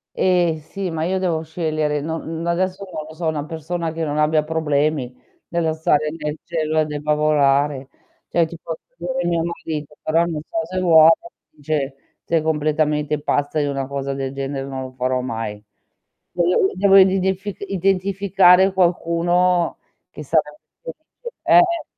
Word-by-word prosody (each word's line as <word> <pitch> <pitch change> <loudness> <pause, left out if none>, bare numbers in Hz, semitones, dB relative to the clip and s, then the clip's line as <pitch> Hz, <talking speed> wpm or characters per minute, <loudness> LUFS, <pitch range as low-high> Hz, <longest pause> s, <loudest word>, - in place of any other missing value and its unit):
Eh 175 -3 +2
sì, 195 0 -5
ma 160 -1 -2
io 190 +3 0
devo 165 -4 0
scegliere. 155 -2 -2
Non 160 +2 -4
adesso, 185 +3 -1
non 155 - -5
lo 155 - -11
so, 170 +1 -5
una 150 -2 -2
persona 165 +1 -4
che 165 0 -4
non 150 -1 -2
abbia 150 0 +3
problemi, 150 -4 -1 0.3
nello 170 -2 0
stare 155 -1 +1
nel 150 -1 -3
cielo 155 -2 0
e 155 - +2
debba 150 0 -1
volare. 145 -2 +2 0.4
Cioè 170 0 +2
ti 165 +1 -10
posso 165 -1 -6 0.2
dire 175 +1 -3
mio 170 -1 +1
marito, 155 -3 -5
però 165 +2 +2
non 165 -3 -3
so 220 -1 -1
se 185 0 -3
vuole, 165 -3 +7 0.4
dice: 145 -2 -3 0.3
"Sei 165 -2 +1
completamente 150 -1 0
pazza, 145 +1 0
io 145 -1 0
una 135 -1 -3
cosa 140 0 -4
del 135 -1 -4
genere 135 0 -4
non 135 -1 -5
lo 130 0 -8
farò 130 0 -1
mai". 115 -4 -5 0.7
Devo 180 +2 +2
i - - -11
devo 195 0 +4
ridef 190 0 +4 0.2
identificare, 190 0 +3
qualcuno 175 -1 +1 0.3
che 150 - -9
sarebbe 150 0 0 0.2
felice, 485 +2 -11
eh. 345 -1 +4
160 Hz, 160 wpm, -21 LUFS, 150-175 Hz, 0.7 s, vuole